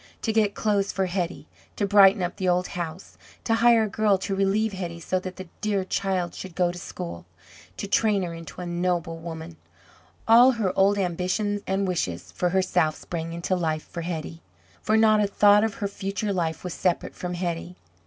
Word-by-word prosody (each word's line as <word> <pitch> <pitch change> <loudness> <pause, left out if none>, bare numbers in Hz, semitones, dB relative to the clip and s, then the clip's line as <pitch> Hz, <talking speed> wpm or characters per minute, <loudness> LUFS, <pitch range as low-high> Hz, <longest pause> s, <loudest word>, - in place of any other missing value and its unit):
To 220 - 0
get 215 -2 +2
clothes 205 -2 +1
for 190 +1 0
Hetty, 180 -1 -3 0.3
to 205 - 0
brighten 200 -1 +6
up 175 - -3
the 185 -2 0
old 180 0 +1
house, 175 +1 -6 0.2
to 225 - +1
hire 230 0 +5
a - - 0
girl 210 -1 +2
to 195 +1 -3
relieve 195 +2 +1
Hetty, 175 -3 -5
so 185 +3 -1
that 185 0 -7
the 185 -1 -8
dear 205 -3 0
child 185 -3 -1
should 185 -3 -8
go 180 -1 +2
to 175 - -8
school, 85 - -7 0.5
to 200 - -4
train 205 -1 +2
her 170 -1 -4
into 165 +1 -9
a - - -5
noble 175 -1 -1
woman 165 0 -8 0.7
all 240 +3 +7
her 210 -6 -1
old 200 +1 +4
ambitions 190 +3 -1
and 195 +1 0
wishes 90 - -3
for 180 - 0
herself 180 -4 +1
sprang 165 -1 -5
into 170 +2 -1
life 160 -3 -1
for 170 - -6
Hetty. 165 -1 -5 0.4
For 220 - +2
not 215 -1 +5
a 205 - +2
thought 205 +1 +5
of 220 -2 -1
her 200 - -2
future 195 +1 -3
life 165 -3 -2
was 180 -2 -4
separate 180 -2 -1
from 180 0 -5
Hetty. 175 0 -4
185 Hz, 195 wpm, -25 LUFS, 175-205 Hz, 0.7 s, all